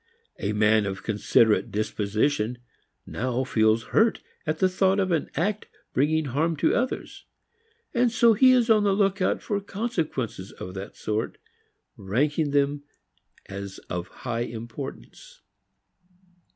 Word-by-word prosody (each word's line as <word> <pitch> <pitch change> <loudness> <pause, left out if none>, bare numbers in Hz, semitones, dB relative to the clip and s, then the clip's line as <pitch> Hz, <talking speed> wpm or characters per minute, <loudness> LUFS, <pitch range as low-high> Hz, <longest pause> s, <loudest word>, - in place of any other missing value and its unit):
A 100 - -1
man 105 0 +3
of 95 -1 -5
considerate 105 0 +2
disposition 110 +4 0 0.5
now 125 +2 -2
feels 110 -2 +2
hurt 225 0 +3 0.2
at 155 +1 0
the 185 - +3
thought 190 +1 +2
of 190 -2 +1
an 165 -3 0
act 200 +7 -1 0.3
bringing 155 +3 +2
harm 155 +5 0
to - - +2
others, 255 +1 -2 0.7
and 240 -2 +3
so 230 0 +5
he 255 +5 +6
is 245 -2 +4
on 215 -2 +5
the 200 -1 +3
lookout 195 -1 +1
for 205 -2 -1
consequences 165 - -3
of 90 - -8
that 95 +2 -8
sort, 110 +1 -2 0.6
ranking 145 - 0
them 145 0 +1 0.6
as 100 0 -7
of 90 0 -3
high 120 -3 -5
importance. 120 - -7
140 Hz, 130 wpm, -26 LUFS, -, 0.7 s, he